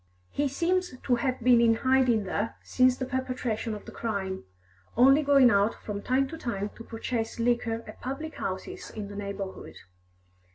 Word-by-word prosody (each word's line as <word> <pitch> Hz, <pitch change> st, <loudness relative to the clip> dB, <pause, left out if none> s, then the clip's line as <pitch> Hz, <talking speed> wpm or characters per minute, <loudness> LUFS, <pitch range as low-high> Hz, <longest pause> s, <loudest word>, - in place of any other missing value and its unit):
He 290 Hz, 0 st, 0 dB
seems 350 Hz, +2 st, 0 dB
to 250 Hz, -, +1 dB
have 255 Hz, +1 st, -1 dB
been 240 Hz, 0 st, +6 dB
in 230 Hz, -1 st, +5 dB
hiding 255 Hz, -3 st, +3 dB
there 205 Hz, +3 st, -2 dB
since 255 Hz, 0 st, +3 dB
the 260 Hz, -, -2 dB
perpetration 255 Hz, -4 st, -2 dB
of 210 Hz, -, -10 dB
the -, -, -9 dB
crime, 195 Hz, -, -3 dB, 0.5 s
only 270 Hz, +4 st, +7 dB
going 275 Hz, -4 st, +6 dB
out 200 Hz, +2 st, +3 dB
from 205 Hz, -1 st, -6 dB
time 265 Hz, +4 st, +1 dB
to 325 Hz, -, -7 dB
time 210 Hz, -7 st, -3 dB
to 230 Hz, -, -10 dB
purchase 225 Hz, 0 st, -3 dB
liquor 230 Hz, -1 st, 0 dB
at -, -, -11 dB
public 290 Hz, +5 st, -4 dB
houses 185 Hz, 0 st, -5 dB
in 210 Hz, -2 st, -6 dB
the 205 Hz, -, -8 dB
neighbourhood. 200 Hz, -1 st, -6 dB
240 Hz, 170 wpm, -28 LUFS, 210-260 Hz, 0.5 s, only